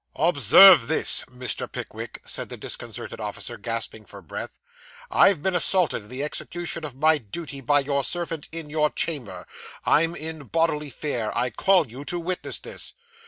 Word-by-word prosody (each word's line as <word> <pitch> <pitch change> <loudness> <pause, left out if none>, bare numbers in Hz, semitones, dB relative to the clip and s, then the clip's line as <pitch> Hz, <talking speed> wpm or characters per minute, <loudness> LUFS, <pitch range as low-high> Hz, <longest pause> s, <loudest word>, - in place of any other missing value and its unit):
'Observe 155 - +7
this, 160 - +4
Mr. 125 0 -3
Pickwick,' - - -7
said - - -5
the - - -7
disconcerted - - -6
officer, 105 +3 -5
gasping 115 0 -4
for 100 - -12
breath. 85 -6 -7 0.5
'I've 175 -7 +4
been 190 - +1
assaulted 180 - +2
in 105 - -13
the 130 +3 -4
execution 170 +2 -4
of 145 -4 -5
my 155 +2 +3
dooty 140 +5 -7
by 145 +3 +3
your 140 0 -1
servant 165 -2 -3
in 165 -1 -6
your 150 -1 +2
chamber. 145 -11 -3 0.4
I'm 165 +2 +3
in 160 -2 -6
bodily 150 -1 0
fear. 125 -6 -3
I 120 +1 0
call 180 - +3
you 125 +5 -9
to 175 - -2
witness 180 +2 -3
this. - - -6
150 Hz, 165 wpm, -24 LUFS, 125-165 Hz, 0.5 s, Observe